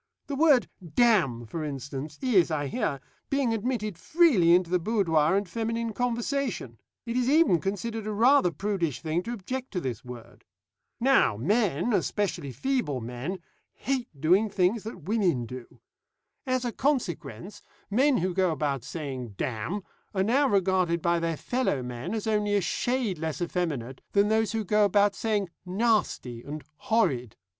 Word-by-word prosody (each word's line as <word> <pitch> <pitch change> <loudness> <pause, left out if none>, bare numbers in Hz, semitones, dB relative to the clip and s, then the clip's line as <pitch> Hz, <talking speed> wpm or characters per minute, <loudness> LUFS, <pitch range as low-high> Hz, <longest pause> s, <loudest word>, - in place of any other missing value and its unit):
The 285 - -4
word 285 -4 +4 0.3
'damn,' 180 - +3
for 155 +8 -5
instance, 140 +1 -5
is, 205 -11 +4
I 150 -2 -1
hear, 145 - -2 0.3
being 275 -4 +1
admitted 215 -5 -2
freely 220 - +5
into 180 -1 +1
the 180 - +3
boudoir 170 -5 +2
and 200 -1 -1
feminine 230 +3 -2
conversation; 240 - -2 0.3
it 235 0 -3
is 250 0 +1
even 300 - +5
considered 215 +3 -3
a - - -1
rather 230 -1 +4
prudish 170 - -2
thing 160 +1 -1
to 230 - -6
object 255 +5 -5
to 180 - 0
this 125 -9 -4
word. 125 -2 -11 0.6
Now, 255 - +4
men, 200 - +1
especially 200 -9 -1
feeble 150 - -1
men, 125 +11 -5 0.3
hate 255 -2 -2
doing 185 +9 +3
things 195 +3 +1
that 200 -7 -7
women 180 - +1
do. 125 +1 -8 0.8
As 255 -1 0
a 240 - -1
consequence, 185 - -2 0.3
men 265 +5 +4
who 180 +1 0
go 185 0 +2
about 140 -5 -1
saying 130 - -6
'damn' 130 - -3 0.3
are 190 - +2
now 265 +7 +3
regarded 185 -5 +1
by 170 0 +2
their 165 -1 -1
fellow 245 - -1
men 125 - -4
as 220 - -3
only 210 -2 +1
a 200 - +3
shade 235 0 -1
less 160 -1 -3
effeminate 155 -8 -3
than 200 +1 +4
those 220 -1 +1
who 220 -1 -1
go 210 +2 +3
about 205 0 +4
saying 205 -5 -1
'nasty' 190 - 0
and 150 +4 -7
'horrid.' 130 - 0
190 Hz, 155 wpm, -27 LUFS, 155-230 Hz, 0.8 s, freely